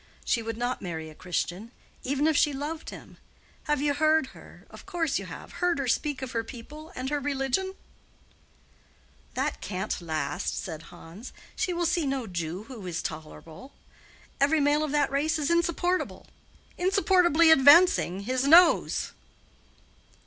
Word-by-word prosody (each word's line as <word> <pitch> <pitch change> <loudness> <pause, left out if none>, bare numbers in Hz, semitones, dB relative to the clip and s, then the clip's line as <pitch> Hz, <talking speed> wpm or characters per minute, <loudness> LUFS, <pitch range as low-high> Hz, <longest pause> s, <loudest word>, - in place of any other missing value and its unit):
"She 235 - +1
would 225 -1 -5
not 245 +1 -2
marry 160 -4 -6
a - - -13
Christian, 180 +5 -3 0.3
even 280 +3 -1
if 315 -1 +3
she 290 0 +3
loved 300 +4 -5
him. - - -12 0.5
Have 295 -1 0
you 290 -1 +2
heard 310 +1 +3
her—of - - -15
course 330 -5 -1
you - - -8
have—heard 355 -1 -2
her 275 -2 -2
speak 270 +2 -1
of 255 - -5
her 230 -1 -1
people 290 +7 -11
and 260 +2 -4
her 295 - 0
religion?" 285 +7 -1 1.6
"That - - -2
can't 190 0 -3
last," 155 -4 -3
said 160 -1 -5
Hans. 175 +7 -11 0.2
"She 365 - -1
will 345 0 -1
see 335 -3 +1
no 270 -3 -2
Jew 175 0 -4
who 225 -5 -9
is 170 -2 -3
tolerable. 160 - -8 0.7
Every 290 +3 +3
male 290 +1 +2
of 305 - -2
that 290 -2 +1
race 290 +3 +1
is 300 +1 -1
insupportable—'insupportably 350 0 +1
advancing'—his 270 - +5
nose." 335 +3 +5
280 Hz, 140 wpm, -27 LUFS, 215-315 Hz, 1.6 s, advancing'—his